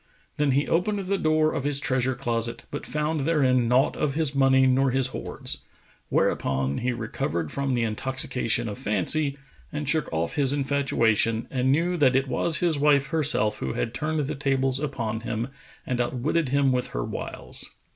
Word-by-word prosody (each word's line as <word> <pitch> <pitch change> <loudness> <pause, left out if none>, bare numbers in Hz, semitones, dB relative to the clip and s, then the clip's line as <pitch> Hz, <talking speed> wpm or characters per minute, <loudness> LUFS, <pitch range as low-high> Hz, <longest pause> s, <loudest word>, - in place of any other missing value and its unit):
Then 145 -2 +2
he 140 +2 +1
opened 185 +5 +1
the 195 0 -1
door 155 0 +2
of - - -2
his 145 -1 +3
treasure 130 -1 0
closet, 120 -2 -2
but 145 - -5
found 150 +1 -1
therein 135 -5 +2
naught 125 +3 +3
of 140 -2 -1
his 155 -3 0
money 135 -1 +4
nor 130 +1 +3
his 130 0 +2
hoards; - - -5 0.5
whereupon 70 +1 0
he 125 +1 0
recovered 85 -9 -3
from 140 -2 -1
the 120 - +1
intoxication 120 +1 0
of 105 - -6
fancy 140 - +1 0.3
and 150 -1 -4
shook 155 0 +1
off 80 +1 -2
his 140 -2 +4
infatuation 120 -5 +1
and 130 0 +1
knew 170 +5 +1
that 135 -5 +4
it 135 +1 +2
was 155 +6 +1
his 165 -4 +1
wife 140 -2 +3
herself 145 -9 +1
who 65 - -3
had 115 - -2
turned 155 +3 -1
the 145 +1 -2
tables 135 -2 0
upon 120 -7 -3
him 115 +1 -3 0.4
and 125 -1 -1
outwitted 130 +5 -1
him 140 0 +2
with 125 -1 0
her - - -4
wiles. - - -6
135 Hz, 175 wpm, -25 LUFS, 120-150 Hz, 0.5 s, money